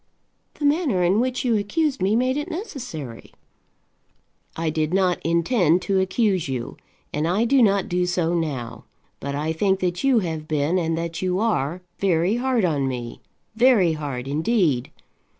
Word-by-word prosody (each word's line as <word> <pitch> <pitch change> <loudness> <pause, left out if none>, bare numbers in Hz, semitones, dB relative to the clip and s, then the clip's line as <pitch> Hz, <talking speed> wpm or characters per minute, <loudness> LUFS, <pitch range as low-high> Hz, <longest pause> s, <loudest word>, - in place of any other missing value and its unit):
"The 295 - -3
manner 285 - +2
in 185 +5 +3
which 255 +1 -1
you 235 -2 +2
accused 270 +8 -1
me 195 +3 +2
made 255 +2 +1
it 295 +4 -3
necessary." 255 - -7 1.2
"I 165 -1 -1
did 155 +2 -1
not 185 -2 +1
intend 170 +1 +2
to 195 -2 +1
accuse 190 -2 +1
you, 125 -3 -4 0.4
and 150 +2 0
I 195 +7 +1
do 265 +2 +4
not 200 -4 +3
do 180 0 0
so 175 -1 0
now; 140 -9 -3 0.3
but 140 0 -4
I 155 +3 -1
think 190 +3 +1
that 180 -1 -1
you 270 -3 +4
have 160 -6 -2
been, 155 +4 +1
and 165 -1 -1
that 165 0 -4
you 185 -1 0
are, 180 -6 -1 0.2
very 185 +2 +2
hard 250 -3 +1
to 160 -5 +1
me, 125 -3 -4 0.3
very 220 -8 +4
hard 140 -5 -5
indeed. 155 - +1
180 Hz, 165 wpm, -23 LUFS, 155-225 Hz, 1.2 s, do